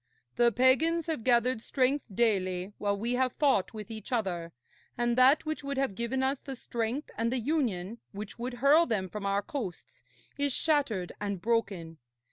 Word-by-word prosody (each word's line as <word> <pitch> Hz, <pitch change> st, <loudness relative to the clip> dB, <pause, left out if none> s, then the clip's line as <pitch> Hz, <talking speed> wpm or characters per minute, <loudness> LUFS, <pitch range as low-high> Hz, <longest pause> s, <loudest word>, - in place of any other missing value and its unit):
'The 240 Hz, -1 st, +4 dB
pagans 295 Hz, +8 st, +3 dB
have 315 Hz, -9 st, -3 dB
gathered 240 Hz, -1 st, +3 dB
strength 270 Hz, +3 st, +1 dB
daily 190 Hz, -3 st, 0 dB
while 200 Hz, -1 st, 0 dB
we 235 Hz, +4 st, -1 dB
have 255 Hz, 0 st, +1 dB
fought 275 Hz, -10 st, +2 dB
with 215 Hz, -1 st, -8 dB
each 220 Hz, 0 st, -8 dB
other, 180 Hz, -8 st, -1 dB, 0.5 s
and 240 Hz, -1 st, +1 dB
that 265 Hz, +5 st, +5 dB
which 310 Hz, -1 st, -3 dB
would 280 Hz, 0 st, -3 dB
have 270 Hz, -6 st, 0 dB
given 235 Hz, +5 st, -1 dB
us 265 Hz, +1 st, 0 dB
the 270 Hz, -, -6 dB
strength 235 Hz, +4 st, -3 dB
and 230 Hz, +1 st, +1 dB
the 260 Hz, -, +1 dB
union 235 Hz, -, -1 dB
which 210 Hz, +3 st, -8 dB
would 245 Hz, +1 st, -4 dB
hurl 290 Hz, +7 st, +5 dB
them 195 Hz, -4 st, 0 dB
from 200 Hz, +1 st, -5 dB
our 200 Hz, +1 st, +1 dB
coasts 220 Hz, -, -6 dB, 0.4 s
is 285 Hz, 0 st, +1 dB
shattered 260 Hz, -, 0 dB
and 200 Hz, -2 st, -2 dB
broken. 195 Hz, -7 st, -1 dB
235 Hz, 175 wpm, -30 LUFS, 200-270 Hz, 0.5 s, that